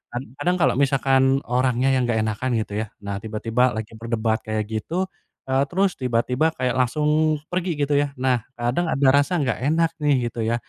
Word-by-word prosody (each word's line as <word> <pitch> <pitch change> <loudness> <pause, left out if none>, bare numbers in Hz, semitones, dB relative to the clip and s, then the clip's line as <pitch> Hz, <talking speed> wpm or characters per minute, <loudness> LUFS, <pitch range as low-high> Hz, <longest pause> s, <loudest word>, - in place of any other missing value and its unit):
kan 120 - -1 0.2
kadang 180 0 +1
kalau 130 -4 +4
misalkan 135 -1 +3 0.2
orangnya 125 +1 +1
yang 125 -2 +1
enggak 115 -2 +1
enakan 110 +4 -2
gitu 105 - -7
ya. - - -2 0.2
Nah 100 -1 -4
tiba-tiba 115 +3 0
lagi 110 0 -5
berdebat 115 -1 -1
kayak 110 0 -1
gitu, 110 +9 -4 0.6
eee, 135 +1 +3
terus 190 +3 +1
tiba-tiba 125 +3 0
kayak 125 -1 0
langsung 150 +4 +2 0.2
pergi 180 0 -1
gitu 145 0 -1
ya, 145 - +1
nah 130 -2 +1 0.2
kadang 120 +9 0
ada 135 0 +2
rasa 145 +6 0
enggak 130 -7 -1
enak 160 +5 +2
nih 145 -1 +3 0.2
gitu 115 - -8
ya 115 - +1
130 Hz, 185 wpm, -23 LUFS, 115-145 Hz, 0.6 s, kalau